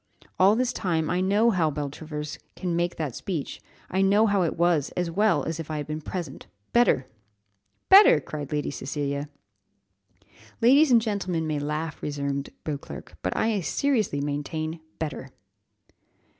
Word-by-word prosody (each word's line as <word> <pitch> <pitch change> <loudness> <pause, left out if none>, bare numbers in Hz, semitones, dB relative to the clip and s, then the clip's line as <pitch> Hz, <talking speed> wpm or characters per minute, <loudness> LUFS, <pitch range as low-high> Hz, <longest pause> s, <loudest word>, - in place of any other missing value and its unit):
All 195 +3 +6
this 250 +1 0
time 165 -5 -1
I 180 +1 +1
know 205 +5 +3
how 170 -6 +2
Beltravers 150 +1 -5 0.2
came 180 -2 -3
to - - 0
make 175 +1 0
that 150 -7 -4
speech 165 -8 -4 0.3
I 190 - 0
know 200 +3 +4
how 200 -3 +2
it 170 - -1
was, 170 -4 +2
as 175 -2 -1
well 180 -5 +2
as 165 0 -4
if 160 - -6
I 155 - -2
had 145 - -3
been 155 +1 -5
present 170 - -6 0.3
better!" 235 - +4 0.8
"Better!" 395 +2 +8
cried 145 -2 -7
Lady 150 -1 -1
Cecilia. 140 +1 -3 1.3
"Ladies 275 +6 +6
and 230 -2 +6
gentlemen 185 -7 -1
may 155 -2 -1
laugh," 150 +2 -3
resumed 140 -1 -3
Beauclerc, 145 -3 -7
"but 90 - -2
I 220 -3 +1
seriously 215 - 0
maintain 155 +3 -3 0.2
better!" 145 -4 -5
160 Hz, 155 wpm, -26 LUFS, 150-195 Hz, 1.3 s, Better